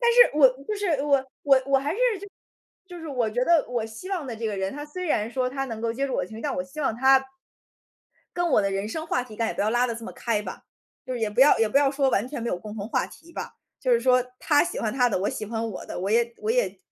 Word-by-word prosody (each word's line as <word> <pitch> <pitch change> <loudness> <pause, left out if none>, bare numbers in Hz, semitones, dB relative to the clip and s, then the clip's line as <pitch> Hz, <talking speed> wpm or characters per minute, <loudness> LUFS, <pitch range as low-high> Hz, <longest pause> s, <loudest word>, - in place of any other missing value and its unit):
但 470 -1 +4
是 485 -9 +6
我 280 -3 +8 0.2
不 425 - -2
是 410 -1 -2
我 280 -2 +2 0.2
我 270 -2 +5
我 275 0 +4
还 285 +4 -2
是， 410 - -5 0.2
就 405 - -9 0.6
就 355 -1 -9
是 325 - -7
我 250 -5 0
觉 245 +3 0
得 335 -1 +4
我 240 -2 -1
希 225 - -9
望 355 -7 -2
的 245 - -5
这 225 +1 -3
个 210 -2 -2
人， 190 0 -2
他 290 +1 -6
虽 365 +5 -6
然 220 -8 0
说 255 0 0
他 270 +1 -2
能 225 -3 -6
够 230 0 -1
接 275 +4 -1
住 265 - -3
我 - - 0
的 - - -4
情 220 - -10
绪， - - -9
但 290 - -1
我 270 - -1
希 275 +3 -8
望 270 -6 0
他 265 +1 +5 1.1
跟 350 -1 0
我 215 - +4
的 195 - 0
人 195 +2 -2
生 315 +8 -4
话 250 - 0
题 240 -3 -11
应 - - -16
该 230 - +1
也 - - -3
不 - - -3
要 210 +2 +2
拉 240 +2 +2
得 235 - -3
这 230 0 -8
么 - - -7
开 225 -3 -1
吧。 - - -8 0.4
就 255 - -3
是 240 - -4
也 220 -2 0
不 210 - 0
要 285 +2 +7
也 225 - +3
不 245 - +4
要 280 -1 +3
说 275 -1 +1
完 220 +2 0
全 270 -4 -5
没 235 - -2
有 180 - -2
共 210 +3 -9
同 200 -1 -4
话 - - 0
题 335 +1 -16
吧。 - - -6 0.3
就 255 - 0
是 235 - +5
说， 250 +1 +4 0.2
他 295 -2 +3
喜 350 - -4
欢 215 - -1
他 250 -2 +3
的， 210 - 0
我 195 - 0
喜 215 - -5
欢 225 +1 -3
我 185 - -8
的， - - -6
我 190 +3 -2
也 235 +1 +2
我 430 - -2
也 - - +2
挺 - - -20
255 Hz, 335 characters per minute, -25 LUFS, 225-290 Hz, 1.1 s, 我